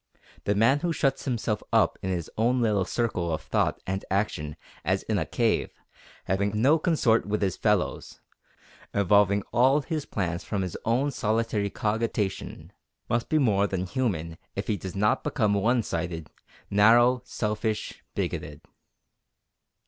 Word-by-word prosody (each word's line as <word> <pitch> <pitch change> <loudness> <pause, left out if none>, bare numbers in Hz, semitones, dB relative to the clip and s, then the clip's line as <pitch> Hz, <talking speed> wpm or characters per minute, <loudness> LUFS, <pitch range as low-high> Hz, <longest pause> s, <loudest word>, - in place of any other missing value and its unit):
The 100 - +1
man 115 +7 +4
who 175 +2 -1
shuts 135 -4 0
himself 115 -5 -1
up - - +3
in 95 - -3
his 85 -3 -2
own 120 +3 +2
little 105 -5 +2
circle 95 -7 -1
of 80 - -3
thought - - 0
and 95 +1 -3
action 95 -7 -1 0.3
as - - 0
in - - 0
a - - -2
cave, - - +1 0.6
having 100 +2 0
no 145 +8 +4
consort 135 - +2
with 105 0 0
his 95 -2 0
fellows, 105 -4 -1 0.8
evolving 100 0 +4
all 130 +4 +4
his 155 -1 -3
plans 90 -4 -2
from 100 -3 -2
his 90 - -5
own 130 +6 +1
solitary 110 -3 0
cogitation, 105 -2 -2 0.4
must 120 0 0
be 155 - +3
more 105 -8 +3
than 95 -2 -2
human 90 -9 -2 0.2
if - - -3
he 105 - 0
does 95 -1 -7
not 105 +2 +2
become 110 -8 +1
one 115 +4 +2
sided, 80 -3 -4 0.4
narrow, 120 +5 +5
selfish, 110 -2 -3
bigoted. - - -3
105 Hz, 150 wpm, -27 LUFS, 95-120 Hz, 0.8 s, narrow